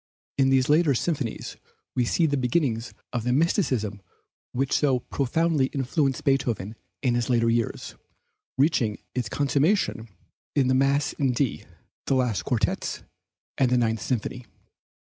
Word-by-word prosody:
In 135 -1 +4
these 130 -1 +3
later 150 -2 +4
symphonies 140 -4 -2 0.4
we 125 - +2
see 165 +7 +2
the 145 -2 +1
beginnings 125 -3 0 0.2
of 120 -2 -1
the 125 - 0
mysticism 130 - +1 0.5
which 135 +2 -1
so 135 -4 +2
profoundly 145 +2 +1
influenced 135 0 0
Beethoven 120 -7 0 0.3
in 125 -3 +2
his 120 0 0
last 120 -2 +3
years, 115 -1 0 0.6
reaching 130 -7 +2 0.2
its 125 -4 -2
consummation 140 - +1 0.5
in 135 -3 +3
the - - +4
Mass 140 +2 +2
in 135 -3 0
D, 125 0 -1 0.4
the 135 - +2
last 115 -10 0
Quartets, 110 -5 -1 0.6
and 130 -2 +4
the 125 - +3
Ninth 115 -2 +1
Symphony. 125 0 -3
130 Hz, 140 wpm, -25 LUFS, 120-140 Hz, 0.6 s, In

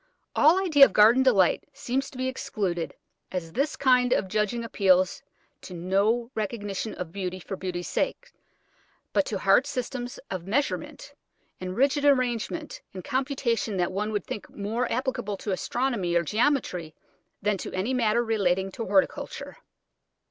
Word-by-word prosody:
All 315 +6 +5
idea 320 -7 +6
of - - -3
garden 225 +5 +6
delight 205 -9 +4
seems 270 0 -2
to 265 - -12
be 260 0 -1
excluded, 190 -9 -3 0.4
as 165 -3 -4
this 285 +3 0
kind 250 -2 +4
of 190 - 0
judging 215 +4 -1
appeals 185 -5 +2 0.4
to 180 - -9
no 200 +7 +1
recognition 210 -1 -3
of 180 -3 -6
beauty 185 -1 -4
for 195 - -6
beauty's 180 -2 -4
sake, - - -2 0.8
but 290 - +2
to 210 - -2
hard 195 +8 +4
systems 250 0 -4
of 185 -2 -4
measurement 280 +8 -2 0.5
and 185 0 -5
rigid 280 +3 +2
arrangement 270 +3 0
and 185 - -6
computation 255 -6 -1
that 175 0 0
one 210 +3 -2
would 205 -3 -2
think 210 - -6
more 225 +4 -2
applicable 245 -5 -2
to 205 - -4
astronomy 210 -3 -1
or 170 - +3
geometry 210 - 0 0.5
than 205 -1 +1
to - - -6
any 195 +8 -1
matter 235 -1 +2
relating 195 -4 +1
to 230 - -5
horticulture. 195 -1 0
215 Hz, 150 wpm, -26 LUFS, 190-255 Hz, 0.8 s, idea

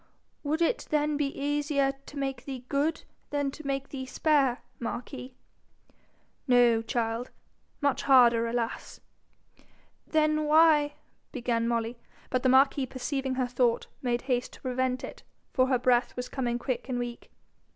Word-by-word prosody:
'Would 310 +3 0
it 465 - 0
then 300 0 +1
be 290 -1 +1
easier 285 -1 +1 0.2
to 290 - -10
make 270 -3 -3
thee 260 -3 -6
good 295 +3 0 0.3
than 285 -1 -1
to 300 0 -9
make 275 0 -2
thee 260 -2 -6
spare, 275 -3 +2 0.2
marquis?' 250 +2 -6 1.1
'No, 240 -3 +5
child 230 0 -2 0.5
much 280 -2 +1
harder, 240 -4 +5
alas!' 230 -1 -3 1.1
'Then 305 -1 +2
why 300 -1 +5 0.2
?' - - -44
began 235 -2 -1
Molly; 230 0 -1 0.3
but 255 - +1
the 260 - +3
marquis 270 +1 +4
perceiving 265 +1 -3
her 255 -1 +1
thought, 245 -1 +1 0.2
made 240 -2 -1
haste 250 -2 -1
to - - -14
prevent 255 0 -1
it, - - -8 0.3
for 255 -1 +3
her 260 -1 +3
breath 245 0 +2
was 250 0 -5
coming 240 -3 -1
quick 250 +1 -3
and 250 - -1
weak. 240 -1 -5
260 Hz, 150 wpm, -28 LUFS, 245-285 Hz, 1.1 s, No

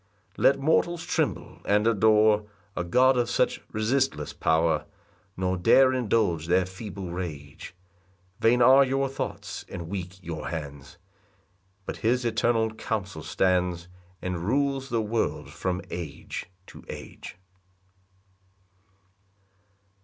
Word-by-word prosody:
4 - - -5
Let 135 0 +5
mortals 165 +3 +1
tremble - - -2
and 105 +1 +2
adore 110 -1 +4 0.3
A 90 - -1
God 125 +8 +4
of 120 -1 +1
such - - +1
resistless 130 +6 0
power, 80 -1 +1 0.5
Nor 95 0 0
dare 130 +9 +5
indulge 105 -9 +1
their 90 +1 +3
feeble 95 -1 -7
rage: 80 -4 -7 0.6
Vain 120 +2 +4
are 135 +3 +8
your 135 +1 0
thoughts, 135 0 -5
and 85 -2 -6
weak 95 -1 -5
your 80 -2 -5
hands; 70 -3 -7 0.9
But - - -5
his 120 +2 +1
eternal 110 0 +1
counsel 100 -7 -4
stands, 90 +1 0 0.3
And 90 -1 -2
rules 135 +7 0
the 115 -3 0
world 110 +2 -2
from 90 0 -3
age 85 -5 -6 0.2
to - - -13
age. - - -9
105 Hz, 115 wpm, -26 LUFS, 90-120 Hz, 0.9 s, are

